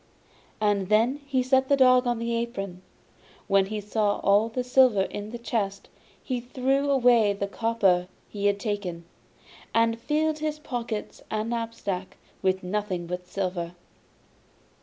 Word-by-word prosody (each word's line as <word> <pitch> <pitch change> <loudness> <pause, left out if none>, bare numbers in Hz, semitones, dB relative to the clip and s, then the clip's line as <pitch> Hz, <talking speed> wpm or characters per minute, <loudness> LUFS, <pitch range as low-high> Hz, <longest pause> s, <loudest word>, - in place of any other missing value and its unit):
And 205 -3 +1
then 230 +6 +3
he 260 -2 +1
set 265 +1 +2
the 280 - +4
dog 255 -1 +5
on 240 -1 +1
the 230 0 -2
apron. 195 -6 -4 0.6
When 195 -1 +3
he 215 +1 -3
saw 210 0 0
all 205 +3 +4
the 250 +2 -2
silver 250 -5 +4
in 205 +2 -5
the 240 - -6
chest, 205 -4 -3 0.3
he 255 -2 -2
threw 265 +3 0
away 240 -6 +4
the 200 0 -2
copper 200 -4 +1 0.2
he 205 -1 -1
had 200 0 +1
taken, 200 -6 -3 0.7
and 230 0 +2
filled 310 +3 0
his 305 0 -2
pockets 240 -7 -5
and 215 +2 -2
knapsack 225 -5 -4 0.2
with 190 -1 +1
nothing 185 -2 -2
but 180 +1 -5
silver. 180 -2 -3
220 Hz, 145 wpm, -26 LUFS, 195-250 Hz, 0.7 s, dog